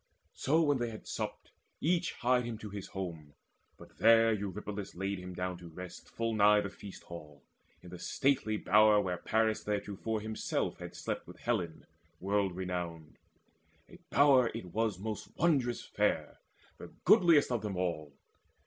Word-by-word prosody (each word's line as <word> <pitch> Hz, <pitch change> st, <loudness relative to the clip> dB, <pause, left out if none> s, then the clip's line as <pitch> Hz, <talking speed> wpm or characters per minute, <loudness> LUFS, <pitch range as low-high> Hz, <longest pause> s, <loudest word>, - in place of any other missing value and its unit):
So 160 Hz, +5 st, +2 dB
when 145 Hz, -3 st, +2 dB
they 120 Hz, -1 st, -1 dB
had 110 Hz, -, -9 dB
supped, -, -, -5 dB, 0.3 s
each 170 Hz, +1 st, +1 dB
hied 125 Hz, -1 st, +2 dB
him 115 Hz, -2 st, -4 dB
to 105 Hz, -2 st, -8 dB
his 100 Hz, -1 st, -6 dB
home; 80 Hz, -6 st, -6 dB, 0.4 s
But -, -, -16 dB
there 115 Hz, 0 st, +6 dB
Eurypylus 105 Hz, 0 st, -5 dB
laid 95 Hz, +1 st, -2 dB
him 90 Hz, 0 st, -8 dB
down 90 Hz, 0 st, -3 dB
to 90 Hz, -, -10 dB
rest 90 Hz, +1 st, -9 dB
Full 115 Hz, 0 st, -2 dB
nigh 105 Hz, 0 st, +6 dB
the 100 Hz, -, -5 dB
feast 100 Hz, -1 st, -11 dB
hall, 75 Hz, -4 st, -11 dB, 0.4 s
in 90 Hz, -, -11 dB
the 90 Hz, -, -8 dB
stately 125 Hz, -4 st, +1 dB
bower 105 Hz, 0 st, +5 dB
Where 90 Hz, -3 st, -1 dB
Paris 110 Hz, +3 st, +1 dB
theretofore 105 Hz, +1 st, -2 dB
himself 110 Hz, 0 st, -2 dB
had -, -, -8 dB
slept -, -, -4 dB
With -, -, -11 dB
Helen 90 Hz, -9 st, -2 dB, 0.3 s
world 100 Hz, -1 st, 0 dB
renowned. 90 Hz, -4 st, -5 dB, 0.7 s
A -, -, -15 dB
bower 135 Hz, -4 st, +5 dB
it 90 Hz, -7 st, -7 dB
was 110 Hz, -3 st, 0 dB
Most 105 Hz, +2 st, -6 dB
wondrous 135 Hz, -8 st, +2 dB
fair, -, -, -1 dB, 0.4 s
the -, -, -8 dB, 0.2 s
goodliest 165 Hz, -7 st, +6 dB
of 120 Hz, -3 st, 0 dB
them 105 Hz, -3 st, -4 dB
all. 85 Hz, -5 st, -2 dB
105 Hz, 160 wpm, -32 LUFS, 90-115 Hz, 0.7 s, there